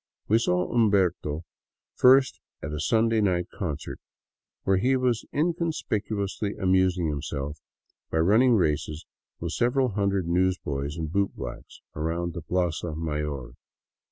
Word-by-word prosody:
We 110 +2 +4
saw 90 -5 0
Umberto 90 -8 +2 0.5
first 130 +1 +5 0.2
at 75 +1 -4
a 75 - -3
Sunday 115 +6 +2
night 90 -3 +1
concert, 75 -7 -4 0.6
where 95 0 +3
he 130 +7 +2
was 125 -3 0
in 165 +4 +1
conspicuously 110 - -2
amusing 95 -2 +2
himself 75 0 -4 0.5
by - - -1
running 110 +9 +5
races 75 -3 0 0.3
with 85 0 -3
several 125 +5 +2
hundred 100 -3 0
newsboys 85 -5 0
and 80 -1 -2
bootblacks 100 +2 -3
around 85 +2 -2
the 85 - -5
plaza 85 -2 -1
mayor. 75 -5 -3
90 Hz, 125 wpm, -26 LUFS, 80-110 Hz, 0.6 s, first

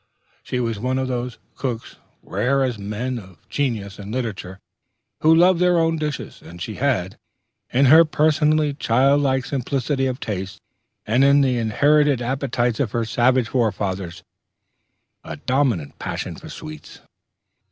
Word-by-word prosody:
She 125 - -3
was 115 -4 -2
one 130 +3 -1
of 130 0 -1
those 125 -1 -3 0.2
cooks 120 -4 -5 0.3
rare 135 +2 0
as 125 -5 -2
men 115 +5 -3
of 95 -2 -16
genius 110 -7 -2
in 100 +1 -7
literature 105 -6 -4 0.6
who 160 +1 +5
love 175 +1 +5
their 180 -1 +3
own 165 0 +2
dishes; 150 -2 -5
and 85 +1 -12
she 105 +4 -6
had, 110 -10 0 0.5
in 135 +3 +3
her 160 +5 +8
personally 155 -1 +2
child 140 +2 +2
like 130 -2 +1
simplicity 135 0 -1
of 130 0 -3
taste, 95 -5 -5 0.5
and 115 +5 +2 0.2
the 130 -2 +2
inherited 145 +5 +3
appetites 125 -2 -1
of 120 -7 -1
her 115 -1 0
savage 120 +1 +2
forefathers, 100 -7 -2 1.0
a - - -7
dominant 125 - -1
passion - - -4
for - - -11
sweets. 75 -1 -10
125 Hz, 140 wpm, -22 LUFS, 110-140 Hz, 1.0 s, her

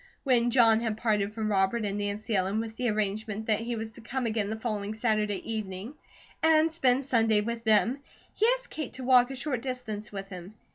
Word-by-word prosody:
When 240 -3 +3
John 230 -3 +5
had 225 -2 -2
parted 210 -3 0
from 215 -1 -2
Robert 200 +3 +1
and 200 0 -2
Nancy 205 +2 -2
Ellen, 195 +3 +1
with 225 0 -5
the 245 0 0
arrangement 215 +1 -2
that 215 -2 +2
he 235 +1 -3
was 220 0 -5
to 235 - -13
come 255 +3 -3
again 215 -3 -1
the 220 - -2
following 215 -2 -3
Saturday 215 -3 0
evening 205 +3 -5 0.5
and 320 0 +4
spend 265 -4 +2
Sunday 225 -5 +3
with 230 +2 -4
them, 220 +5 +3 0.3
he 440 - +2
asked - - -15
Kate 305 -5 -5
to 260 - -8
walk 250 -1 +5
a 270 - -5
short 260 -2 -2
distance 235 -5 -5
with 195 -1 -6
him. 185 +2 -9
220 Hz, 205 wpm, -28 LUFS, 210-245 Hz, 0.5 s, John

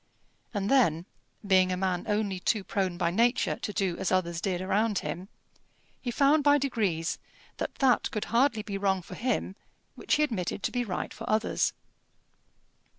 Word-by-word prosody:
And 200 -3 -2
then, 180 - +3 0.4
being 185 -2 +4
a 180 - -1
man 185 0 -1
only 205 -3 0
too 205 +2 0
prone 190 -3 -1
by 170 -1 +1
nature 235 +6 +2
to 210 - -4
do 190 -4 -1
as - - -1
others 170 -2 0
did 185 -3 -1
around 205 +3 +1
him, 175 +6 -5 0.7
he 250 - -3
found 285 +4 +3
by 290 0 +6
degrees 210 - -1 0.4
that - - -4
that 260 -3 +3
could 215 - -3
hardly 235 -3 +3
be 200 -2 -4
wrong 190 -2 +1
for - - -10
him 235 -5 -2 0.4
which - - 0
he 300 - +2
admitted 200 -9 -2
to - - 0
be 245 -1 0
right 185 -6 -4
for 225 - -7
others. 215 +1 +1
200 Hz, 170 wpm, -28 LUFS, 185-235 Hz, 0.7 s, by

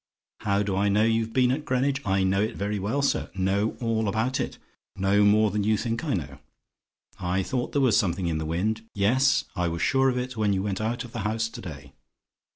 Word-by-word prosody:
"HOW 100 0 +1
DO 100 -2 -2
I 100 +1 +2
KNOW 105 +2 +3
YOU'VE 115 0 +1
BEEN 125 -1 +3
AT 145 +3 -2
GREENWICH? 135 +2 0
"I 95 0 +2
know 95 +1 +2
it 110 - -1
very 100 +1 -2
well, 110 +9 -1
sir: 140 - 0
know 95 +3 0
all 115 -3 0
about 110 +6 0
it: - - -3 0.4
know 100 +2 +3
more 105 +1 +4
than 105 0 -1
you 110 +1 +2
think 115 +4 -2
I 150 -7 0
know. 75 -5 -5 0.8
I 95 0 0
thought 125 +5 -2
there 145 - +2
was 125 -4 +4
something 90 -1 0
in 80 -2 -1
the 80 - -3
wind. 105 +7 -1
Yes, 125 +6 +3
I 90 0 0
was 85 0 -2
sure 135 0 +3
of 125 - -1
it, 125 0 -3
when 105 -2 +1
you 95 0 -1
went 100 -1 -2
out 115 +4 -2
of 120 - -11
the 115 - -5
house 110 +2 -1
to - - -9
day. 70 -6 -9
105 Hz, 230 wpm, -26 LUFS, 95-120 Hz, 0.8 s, more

